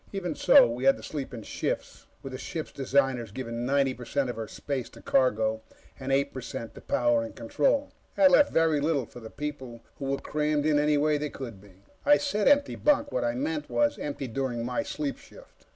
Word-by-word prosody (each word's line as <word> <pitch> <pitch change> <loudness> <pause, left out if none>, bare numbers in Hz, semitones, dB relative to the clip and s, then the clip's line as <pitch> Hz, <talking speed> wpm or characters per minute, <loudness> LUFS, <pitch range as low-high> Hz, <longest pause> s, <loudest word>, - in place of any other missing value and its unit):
Even 180 -4 -3
so, - - +7
we 120 +3 -4
had 135 - +5
to - - -12
sleep 145 -3 -5
in 115 -3 -7
shifts, - - -4 0.2
with 135 - -7
the 130 - -5
ship's 160 0 -5
designers 135 -4 0
giving 120 0 -4
ninety 135 -1 +2
per 125 - -10
cent 130 +1 -1
of - - -9
her 110 -1 -5
space 135 -4 -4
to - - -15
cargo, 110 -4 +1 0.4
and 135 0 -4
eight 140 +1 +1
per 130 - -5
cent 115 -1 -6
to - - -12
power 120 -2 +2
and 115 - -7
control. 150 - 0 0.2
That 285 -1 +6
left 290 +2 +5
very 160 -3 +3
little 145 -4 +1
for 120 - -12
the 110 -1 -9
people, 130 -5 -6 0.2
who 140 - -4
were 135 0 0
crammed 150 0 -1
in 150 -1 +3
any 150 0 +3
way 150 0 +2
they 150 0 -2
could 115 -9 -8
be. 100 -1 -19 0.2
I 290 +1 +6
said 245 -8 0
empty 285 0 +4
bunk. 290 -1 +2
What - - -1
I 295 0 0
meant 300 +3 -2
was, 290 0 +1
empty 140 -2 -4
during 120 -1 -2
my 125 0 -1
sleep 145 -2 -4
shift. - - -18
140 Hz, 220 wpm, -28 LUFS, 120-155 Hz, 0.4 s, so